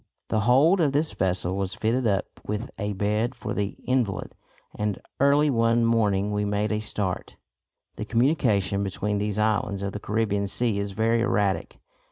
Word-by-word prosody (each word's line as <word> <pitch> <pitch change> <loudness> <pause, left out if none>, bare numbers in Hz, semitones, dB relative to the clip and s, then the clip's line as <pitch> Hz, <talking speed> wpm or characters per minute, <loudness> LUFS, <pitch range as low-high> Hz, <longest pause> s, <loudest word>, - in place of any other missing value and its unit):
The 110 - +1
hold 160 +9 +5
of 145 -4 +2
this 150 +2 +1
vessel 95 -1 -1
was 95 -1 -2
fitted 115 +3 0
up 100 -2 +1 0.2
with 105 +5 -4
a 105 -1 -2
bed 105 +5 0
for - - -5
the 100 -1 -2
invalid, 120 -8 -1 0.4
and 105 -2 -2 0.2
early 145 +2 +4
one 115 -1 +3
morning 105 -3 +2
we 105 0 0
made 105 +1 0
a 105 - 0
start. 100 -4 -3 0.6
The 105 - -4
communication 110 - +1
between 100 +1 -2
these 105 0 -2
islands 105 -2 0
of 100 - -2
the 105 - -5
Caribbean 105 -2 -1
Sea 110 0 0
is 100 -1 -3
very 115 +2 +2
erratic. 105 -5 0
105 Hz, 170 wpm, -25 LUFS, 100-115 Hz, 0.6 s, hold